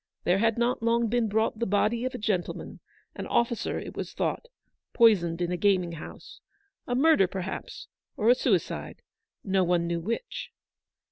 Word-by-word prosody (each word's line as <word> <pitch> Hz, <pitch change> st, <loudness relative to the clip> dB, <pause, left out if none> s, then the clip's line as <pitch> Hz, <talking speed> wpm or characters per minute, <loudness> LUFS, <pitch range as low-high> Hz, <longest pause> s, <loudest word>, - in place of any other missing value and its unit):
There 180 Hz, +2 st, +2 dB
had 225 Hz, +1 st, +2 dB
not 240 Hz, +1 st, +1 dB
long 230 Hz, 0 st, +2 dB
been 235 Hz, 0 st, +1 dB
brought 220 Hz, +1 st, 0 dB
the 235 Hz, -, 0 dB
body 215 Hz, +4 st, +1 dB
of 255 Hz, 0 st, -3 dB
a -, -, -3 dB
gentleman, 205 Hz, -6 st, -3 dB, 0.3 s
an -, -, -6 dB
officer 235 Hz, -1 st, 0 dB
it -, -, -7 dB
was -, -, -5 dB
thought, -, -, -2 dB, 0.5 s
poisoned 180 Hz, -7 st, +4 dB
in 175 Hz, -, -2 dB
a 180 Hz, -, -1 dB
gaming 185 Hz, -2 st, +2 dB
house. 165 Hz, -2 st, -10 dB, 0.5 s
A 245 Hz, -, -1 dB
murder, 280 Hz, -, +5 dB
perhaps, 190 Hz, 0 st, -6 dB, 0.3 s
or 215 Hz, -, 0 dB
a 245 Hz, -, +8 dB
suicide; 255 Hz, -, -1 dB, 0.4 s
no 190 Hz, -1 st, +2 dB
one 175 Hz, -1 st, +1 dB
knew 170 Hz, 0 st, -1 dB
which. 230 Hz, -, -4 dB
215 Hz, 165 wpm, -27 LUFS, 180-235 Hz, 0.5 s, a